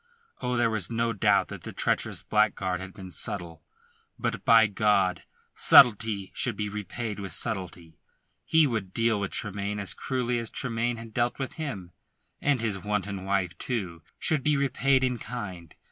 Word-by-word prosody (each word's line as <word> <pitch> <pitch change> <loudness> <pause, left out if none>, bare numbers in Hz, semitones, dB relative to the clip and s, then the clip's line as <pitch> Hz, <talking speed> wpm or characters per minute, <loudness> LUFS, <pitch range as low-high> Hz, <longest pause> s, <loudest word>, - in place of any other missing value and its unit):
Oh, 125 0 -1
there 120 -1 +2
was 105 -5 0
no 115 0 0
doubt 105 - +2
that - - -8
the - - -7
treacherous - - -1
blackguard 95 -4 +1
had 95 0 -8
been 95 -2 -10
subtle. 85 -3 -1 0.5
But - - -3
by 115 -1 +7
God! 105 -3 +1 0.3
subtlety 105 -5 +5
should 120 - -1
be 105 0 -3
repaid 105 +1 -5
with 95 -4 -3
subtlety! 90 -7 -3 0.4
He 160 -1 +4
would 110 -8 -3
deal 115 -2 +2
with 100 -1 -2
Tremayne 105 -1 -3
as 100 -2 0
cruelly 125 -2 -2
as 115 -2 -4
Tremayne 120 -1 -2
had 115 -1 -10
dealt 120 +1 0
with 135 -2 -4
him; 115 - -6 0.5
and 140 -4 +1
his 105 -4 0
wanton 100 -1 -3
wife, 95 -3 0
too, 95 -10 -4 0.2
should 155 -3 +1
be 150 +2 +2
repaid 135 -1 +2
in 125 -2 0
kind. 95 -10 -7
105 Hz, 165 wpm, -27 LUFS, 95-120 Hz, 0.5 s, by